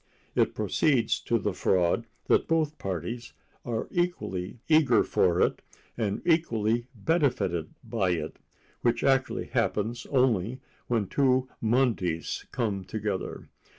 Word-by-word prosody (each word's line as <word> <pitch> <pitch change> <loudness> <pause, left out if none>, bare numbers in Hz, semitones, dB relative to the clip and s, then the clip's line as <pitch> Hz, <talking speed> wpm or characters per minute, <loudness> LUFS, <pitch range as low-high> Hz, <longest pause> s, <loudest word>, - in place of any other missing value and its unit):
It - - +2
proceeds 125 -7 +2
to 115 - +2
the 105 -2 -1
fraud 90 +5 +1 0.2
that - - +3
both 155 -2 +1
parties 100 +6 -4 0.3
are 115 -2 -3
equally 125 - -2
eager 155 -8 +5
for 90 -1 +2
it - - +2 0.3
and 105 -4 -2
equally 120 -9 +2
benefited 110 - 0
by 110 -6 0
it—which 115 +7 -4
actually 135 -1 +2
happens 115 +4 -1
only 125 -3 +2 0.3
when 115 -4 +1
two 130 +3 +2
Mondays 110 -8 0
come 105 -6 -1
together. 100 -1 -4
115 Hz, 115 wpm, -28 LUFS, 100-130 Hz, 0.3 s, eager